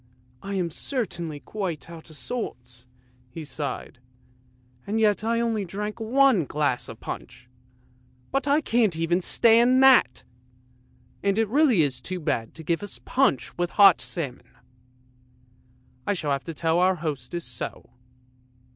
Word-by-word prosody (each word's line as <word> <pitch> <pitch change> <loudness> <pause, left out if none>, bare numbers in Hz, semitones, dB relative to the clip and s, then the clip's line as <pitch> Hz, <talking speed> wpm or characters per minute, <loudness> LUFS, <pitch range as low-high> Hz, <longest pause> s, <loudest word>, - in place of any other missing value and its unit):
" 125 - -34
I 200 0 -5
am 175 -3 -1
certainly 170 - -3
quite 175 -7 -5
out 165 -1 -11
of 155 - -11
sorts," 125 - -6 0.4
he 160 +5 -8
sighed, 140 -3 -5 0.4
" 125 0 -34
and 215 +2 0
yet 210 -1 +2
I 230 +1 +1
only 225 -3 0
drank 210 +4 -5
one 240 - +3
glass 145 -3 -1
of - - -10
punch. 125 0 -8 0.8
But 275 +1 0
I 290 +2 +3
can't 230 - +2
stand 165 +1 -3 0.4
even 235 +3 +6
that! 260 - +5 1.0
and 200 0 +1
it 225 -1 +2
really 255 - +4
is 140 -3 -1
too 185 0 -4
bad 115 -8 -2
to 160 - -9
give 165 +1 -1
us 205 - -7
punch 260 - +1
with 175 0 0
hot 195 -4 +7
salmon! 140 -8 -5 1.6
I 205 - +1
shall 155 -5 -2
have 140 0 -1
to 165 - -5
tell 165 +1 +1
our 185 +1 +3
hostess 155 0 -4
so! 120 -1 -6
175 Hz, 150 wpm, -25 LUFS, 145-220 Hz, 1.6 s, hot